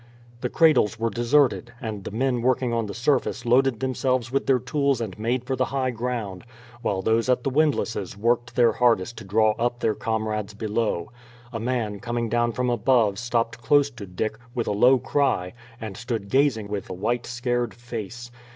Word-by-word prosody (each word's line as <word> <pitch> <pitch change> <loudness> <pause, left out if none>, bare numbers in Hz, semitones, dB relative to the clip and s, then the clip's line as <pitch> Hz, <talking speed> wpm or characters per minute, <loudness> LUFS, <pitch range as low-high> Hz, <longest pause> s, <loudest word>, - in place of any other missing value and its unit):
The 125 - -2
cradles 135 -10 +4
were 115 0 0
deserted, 120 +2 +2
and 110 -6 -5
the - - -3
men 125 +2 0
working 125 0 +1
on 115 -2 0
the 100 - -6
surface 125 0 0
loaded 125 0 +3
themselves 130 -2 0
with 135 - 0
their 135 - +5
tools 135 +1 0
and 110 -5 -4
made 120 +3 0
for 130 +1 -2
the 130 0 +1
high 130 -1 -1
ground, 115 -5 -4 0.4
while 95 -5 -1
those 115 +4 +2
at 125 -1 +2
the 135 - -1
windlasses 130 - 0
worked 120 +2 0
their 120 -2 +5
hardest 120 -2 +2
to - - -9
draw 110 +2 +3
up 120 +1 0
their 110 - +1
comrades 110 -1 -2
below. 110 -2 -2 0.4
A 115 - -3
man 115 -3 -2
coming 120 +1 -2
down 120 +1 +1
from 125 +1 -1
above 115 -4 +2
stopped 115 -1 -1
close 140 +4 +3
to 115 -6 -9
Dick, 90 +4 -3 0.2
with 120 - -1
a - - -1
low 125 +6 +5
cry, 125 -8 0 0.3
and 110 -3 -6
stood 115 -3 -4
gazing 130 -5 +2
with 100 -2 -5
a - - -4
white 115 +6 -1
scared 120 -1 -2
face. 120 0 -7
120 Hz, 190 wpm, -24 LUFS, 110-125 Hz, 0.4 s, their